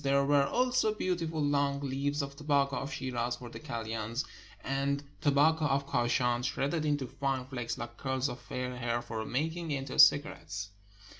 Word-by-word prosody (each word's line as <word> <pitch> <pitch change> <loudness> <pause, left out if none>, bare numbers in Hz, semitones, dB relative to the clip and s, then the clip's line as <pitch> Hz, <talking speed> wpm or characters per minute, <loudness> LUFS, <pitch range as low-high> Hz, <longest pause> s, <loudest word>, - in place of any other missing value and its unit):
There 140 0 +3
were 140 -1 +4
also 250 - +2
beautiful 165 -5 -1
long 140 -1 +2
leaves 140 +2 -1
of 140 0 -6
tobacco 140 -2 +1
of 140 +3 -4
Shiraz 125 -3 -2
for 120 - -9
the 115 - -8
kalyans, 115 0 -3 0.4
and 140 +1 0 0.2
tobacco 150 +2 +4
of 140 -1 +1
Kachan, 120 -1 +1
shredded 145 +5 0
into 145 -3 +1
fine 135 -1 -2
flakes 125 -3 -4
Uke 120 0 -7
curls 130 0 -1
of 125 -2 -6
fair 125 0 -4
hair, 120 -1 -1
for 110 -1 -4
mak 155 +6 -1
ing 170 -2 -5
into 135 -2 -3
cigarettes. 100 - +4
140 Hz, 165 wpm, -31 LUFS, 125-145 Hz, 0.4 s, were